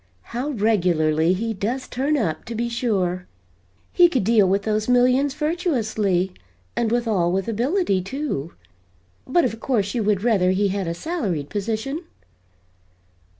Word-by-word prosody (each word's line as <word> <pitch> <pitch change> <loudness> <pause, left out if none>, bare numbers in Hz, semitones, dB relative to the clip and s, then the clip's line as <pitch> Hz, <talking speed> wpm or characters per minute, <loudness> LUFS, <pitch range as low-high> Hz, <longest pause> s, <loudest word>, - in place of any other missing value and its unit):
How 250 +5 -2
regularly 175 - +2
he 225 +4 -2
does 230 +6 -3
'turn 280 +4 0
up,' 170 - -1
to 230 - -6
be 235 +1 -1
sure. 190 -7 -1 0.7
He 350 -1 +6
could 260 - 0
deal 210 -2 +4
with 200 +1 +1
those 215 +1 -1
millions 255 +3 +3
virtuously, 220 - 0 0.4
and 230 -2 0
withal 220 -8 +1
with 190 +1 -1
ability, 235 - +1
too 195 - -4 0.7
but 310 +4 +3
of 225 -2 -3
course 210 -6 0
you 240 - 0
would 205 -2 +1
rather 205 -6 +3
he 195 +2 +2
had 195 -2 -2
a 170 - -2
salaried 185 - -3
position?" 225 - -2
220 Hz, 145 wpm, -22 LUFS, 190-255 Hz, 0.7 s, He